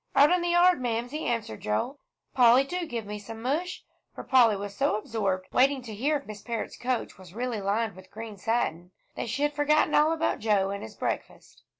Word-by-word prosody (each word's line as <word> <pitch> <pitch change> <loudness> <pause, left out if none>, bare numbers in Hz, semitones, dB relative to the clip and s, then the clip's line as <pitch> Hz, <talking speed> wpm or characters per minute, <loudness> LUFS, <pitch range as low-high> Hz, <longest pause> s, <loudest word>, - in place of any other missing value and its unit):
"Out 285 +3 +6
in 360 0 +3
the 345 - -1
yard, 350 -3 +4
Mamsie," 245 +5 -2
answered 230 - -2
Joel. 175 - -2 0.3
"Polly, 250 +1 +6
do 350 +4 -4
give 230 -5 -4
me 210 +1 -6
some 225 +2 -9
mush," 305 +10 -2 0.3
for - - -7
Polly 240 -5 +5
was 200 0 -6
so 275 +1 +1
absorbed 200 -4 -2
waiting 265 0 +3
to 225 -3 -8
hear 285 +8 +1
if 280 - -12
Miss 210 -1 -9
Parrott's 230 -2 -4
coach 250 -5 -3
was 185 0 -14
really 240 -2 -2
lined 200 +1 -1
with 185 0 -14
green 220 -1 -8
satin, 185 -6 -1 0.2
that 235 - -4
she 270 +6 -1
had 295 0 +1
forgotten 295 +1 +2
all 305 +2 +5
about 325 0 0
Joe 205 -3 +1
and 200 - -4
his 110 - -9
breakfast. - - -5
235 Hz, 210 wpm, -27 LUFS, 205-285 Hz, 0.3 s, Out